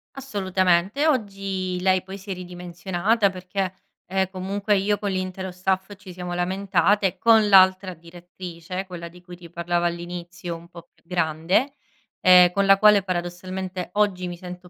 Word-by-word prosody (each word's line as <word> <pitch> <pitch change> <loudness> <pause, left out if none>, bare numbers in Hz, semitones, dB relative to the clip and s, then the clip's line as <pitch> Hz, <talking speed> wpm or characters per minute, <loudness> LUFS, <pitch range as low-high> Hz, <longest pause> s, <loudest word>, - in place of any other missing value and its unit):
Assolutamente 190 - 0
oggi 195 -8 -1
lei 185 0 +3
poi 190 +1 -9
si 200 0 -9
è - - 0
ridimensionata 180 +4 -1
perché, 185 0 -3 0.4
ehm, 190 0 0
comunque 200 +2 -1
io 205 +2 +1
con 200 -1 -3
l’intero 185 0 -4
staff 190 +2 -2
ci 195 -2 -12
siamo 180 0 -6
lamentate 190 +2 +1
con 225 -2 +5
l’altra 190 -1 +5
direttrice, 175 +2 -8
quella 170 -2 -8
di 180 +1 -16
cui 175 0 -11
ti 170 -1 -13
parlavo 175 +1 -1
all’inizio, 175 0 -5
un 170 +1 -13
po’ 170 -1 -13
più - - -33
grande, 175 - 0 0.5
ehm, 180 -1 +7
con 200 +2 +1
la 195 0 +6
quale 210 -2 +6
paradossalmente 185 0 -4
oggi 200 -3 +1
mi 175 -1 -6
sento 180 0 -10
185 Hz, 155 wpm, -23 LUFS, 175-195 Hz, 0.5 s, ehm